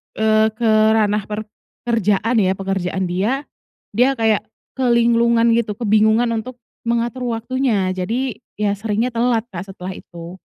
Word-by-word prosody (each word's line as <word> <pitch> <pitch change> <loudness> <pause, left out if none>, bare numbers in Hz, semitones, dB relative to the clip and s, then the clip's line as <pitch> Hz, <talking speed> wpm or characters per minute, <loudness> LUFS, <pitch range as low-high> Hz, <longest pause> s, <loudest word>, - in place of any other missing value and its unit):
eee, 220 0 +3
ke 230 0 0 0.3
ranah 210 -1 +1
per 210 +1 -4 0.4
kerjaan 225 +1 +1
ya, 190 -2 +3
pekerjaan 190 -1 -2
dia, 225 +11 0 0.5
dia 250 +5 +3
kayak 220 -2 +2 0.4
kelinglungan 235 -1 +3
gitu, 230 -2 0
kebingungan 220 +1 +3
untuk 240 +3 -5 0.3
mengatur 235 +2 -1
waktunya 230 -4 0
jadi 230 +7 -2 0.2
ya 205 -1 +1
seringnya 220 +3 -1
telat, 235 -1 +1
Kak, 190 0 -7
setelah 185 0 -7
itu. 170 0 -10
220 Hz, 130 wpm, -19 LUFS, 200-235 Hz, 0.5 s, eee